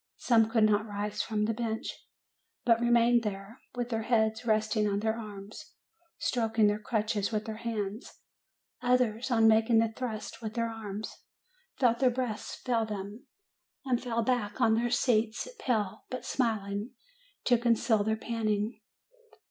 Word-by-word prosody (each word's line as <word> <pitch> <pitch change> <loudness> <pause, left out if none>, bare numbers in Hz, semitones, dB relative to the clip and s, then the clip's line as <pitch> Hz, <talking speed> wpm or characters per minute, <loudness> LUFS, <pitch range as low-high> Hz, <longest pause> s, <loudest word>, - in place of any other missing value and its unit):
Some 225 -3 +3
could 225 -1 +3
not 215 0 +3
rise 205 0 -3
from 210 -1 -1
the 225 - 0
bench, 225 -1 -3 0.7
but 230 -1 +5
remained 240 0 +4
there, 200 +2 -5 0.2
with 245 -1 -2
their 225 -2 -1
heads 220 0 +1
resting 215 0 +2
on 200 0 0
their 220 0 0
arms, 215 +7 -9 0.4
stroking 225 -3 +1
their 210 0 +2
crutches 215 -1 -1
with 215 -1 -1
their 220 -1 -5
hands; 220 -2 -4 0.7
others, 245 -1 +1
on 225 -3 +4
making 225 +1 +4
the 225 0 +4
thrust 225 -2 -5
with 220 0 -5
their 230 -1 0
arms, 215 -1 -6 0.6
felt 240 -3 +3
their 260 -1 +5
breath 245 -3 -2 0.2
fail 235 -3 +2
them, 210 +4 -6 0.6
and 250 -2 +1
fell 235 -2 -1
back 225 -3 -1
on 230 -3 +4
their 235 +2 +1
seats, 230 - +1
pale, 220 - -1
but 255 - -5
smiling 215 -3 -1 0.5
to 245 -2 +4
conceal 230 -2 +2
their 220 +1 0
panting. 220 -1 -2
225 Hz, 150 wpm, -30 LUFS, 215-235 Hz, 0.7 s, but